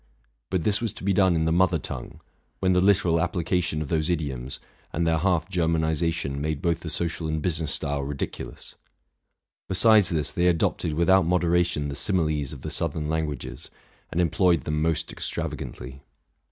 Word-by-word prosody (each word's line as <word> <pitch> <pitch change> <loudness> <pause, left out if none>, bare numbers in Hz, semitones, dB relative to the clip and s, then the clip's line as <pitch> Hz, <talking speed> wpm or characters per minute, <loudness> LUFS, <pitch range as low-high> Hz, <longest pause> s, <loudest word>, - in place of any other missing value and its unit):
But 95 -4 0
this 105 +1 +2
was 115 -4 -2
to - - -11
be 100 +1 +2
done 95 -2 +4
in 80 -1 +1
the 80 - +1
mother 90 0 +3
tongue, 65 -4 -7 0.4
when 95 -1 +2
the 90 - +3
literal 90 -4 +3
application 85 -2 0
of 70 - -9
those 80 -1 0
idioms, 70 -6 -3 0.3
and 85 +2 -1
their 80 -1 +2
half 85 -2 +1
Ger 85 -2 0
manization, 80 -2 0
made 75 0 -2
both 85 +1 0
the 80 - -6
social 85 +1 -2
and 80 0 -1
business 80 -2 -1
style 70 0 -1
ridicu 70 0 -4
lous. - - -11 1.0
Besides 105 +1 +5
this, 80 -4 0
they 90 +1 +1
adopted 80 -2 +1
without 85 +1 +4
moderation 85 -3 +1
the - - -4
similes 75 -6 0
of 70 -4 -9
the - - -4
southern 75 -2 -1
languages, 80 -5 -3 0.4
and 85 - -1
employed 90 -1 +3
them 75 0 -1
most 80 0 0
extravagantly. 65 +2 -5
80 Hz, 175 wpm, -25 LUFS, 75-90 Hz, 1.0 s, Besides